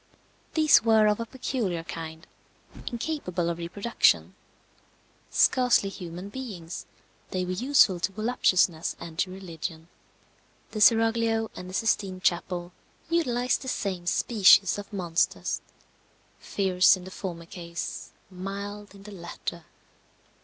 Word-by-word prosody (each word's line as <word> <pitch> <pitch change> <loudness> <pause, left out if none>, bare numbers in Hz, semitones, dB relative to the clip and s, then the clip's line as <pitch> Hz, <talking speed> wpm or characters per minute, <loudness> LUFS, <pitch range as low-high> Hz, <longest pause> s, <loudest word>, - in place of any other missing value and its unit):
These 310 -2 +6
were 220 -2 +5
of 210 0 +2
a 230 - -4
peculiar 220 -9 -3
kind, 160 0 -7 0.6
incapable 225 - -2
of 170 - -6
reproduction. 200 +7 +1 1.0
Scarcely 250 -6 +3
human 180 0 -8
beings, 200 -9 -7 0.4
they 185 -1 -2
were 180 - -3
useful 220 -3 +4
to 185 - -1
voluptuousness 190 -6 +1
and 165 0 -9
to 190 - +1
religion. 170 -3 -7 0.8
The 215 - -4
seraglio 225 0 +4
and 180 - -8
the 185 - -6
Sistine 195 -4 0
Chapel 175 0 -1 0.4
utilized 250 -7 +1
the 265 - -8
same 185 -8 -3
species 195 -1 +5
of 205 - -9
monsters; 175 -4 -1 0.8
fierce 190 0 +3
in 180 - -11
the 185 - -9
former 170 -3 -6
case, 170 0 -6 0.2
mild 200 +2 -6
in 195 - -14
the 210 - -10
latter. 170 -2 -7
195 Hz, 120 wpm, -27 LUFS, 175-225 Hz, 1.0 s, These